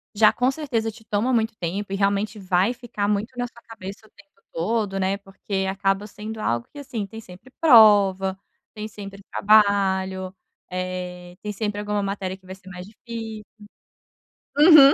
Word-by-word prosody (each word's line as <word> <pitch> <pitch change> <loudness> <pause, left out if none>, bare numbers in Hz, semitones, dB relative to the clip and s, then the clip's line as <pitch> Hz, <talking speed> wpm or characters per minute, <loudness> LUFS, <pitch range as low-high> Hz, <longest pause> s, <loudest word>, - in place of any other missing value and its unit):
já 215 +1 +6
com 250 +2 +2
certeza 250 -7 -2
te 220 +1 -16
toma 215 +5 0
muito 225 -1 +1
tempo 195 +4 -3
e - - +1
realmente 200 +2 0
vai 185 +4 +2
ficar 225 -4 -3
muito 210 +1 0
na 245 - 0
sua 235 0 -18
cabeça 200 -1 -9
o - - -26
tempo 200 -2 -22
todo, 195 +2 -1
né, 190 +1 +1
porque 195 0 -4
acaba 195 +1 0
sendo 215 +2 -7
algo 120 - -1
que, 290 - -9
assim, 235 -7 -4
tem 225 +3 -9
sempre 185 +7 -14
prova, 205 - +6 0.4
tem 215 -1 -5
sempre 200 -2 -9
trabalho, 190 -3 +3 0.4
eh, 180 -1 -5
tem 210 - -4
sempre 205 0 -2
alguma 210 0 -1
matéria 195 -1 -3
que 190 - -26
vai 190 +1 -8
ser 190 0 -15
mais 180 -1 -8
difícil 225 0 -7 1.1
uhum. 300 -3 +9
205 Hz, 170 wpm, -24 LUFS, 190-220 Hz, 1.1 s, uhum